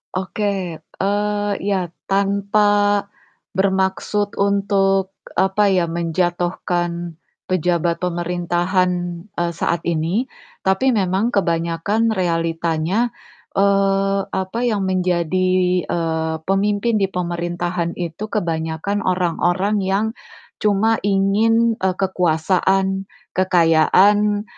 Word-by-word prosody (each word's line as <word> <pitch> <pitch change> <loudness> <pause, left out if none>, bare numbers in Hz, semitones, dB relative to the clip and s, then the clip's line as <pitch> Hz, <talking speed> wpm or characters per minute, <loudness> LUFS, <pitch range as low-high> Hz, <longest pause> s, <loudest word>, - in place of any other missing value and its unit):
Oke, 190 +3 -3 0.4
eee, 205 +2 -1
iya 195 -3 0 0.2
tanpa 200 +1 +1 0.9
bermaksud 190 +2 0
untuk 195 -1 +1 0.2
apa 195 +1 +3
ya, 180 -3 +2
menjatuhkan 175 0 -2 0.3
pejabat 175 -1 +1
pemerintahan, 175 +1 0 0.4
eee, 175 -3 -2
saat 170 +1 0
ini, 170 +9 0 0.4
tapi 225 +8 +3
memang 200 +1 +1
kebanyakan 170 +4 0
realitanya, 165 +2 0 0.5
eee, 195 0 +2 0.2
apa, 190 +4 -2
yang 210 -4 0
menjadi, 185 -1 +1 0.4
eee, 160 -1 -1
pemimpin 205 +4 +1
di 195 - +2
pemerintahan 175 -1 -3
itu 175 +5 -5
kebanyakan 165 0 -2
orang-orang 185 +3 +1
yang 195 +2 0 0.5
cuma 215 +2 +2
ingin, 220 +4 +2
eee, 185 -1 0
kekuasaan, 190 +2 +1 0.2
kekayaan, 185 +4 +3
190 Hz, 85 wpm, -20 LUFS, 175-200 Hz, 0.9 s, apa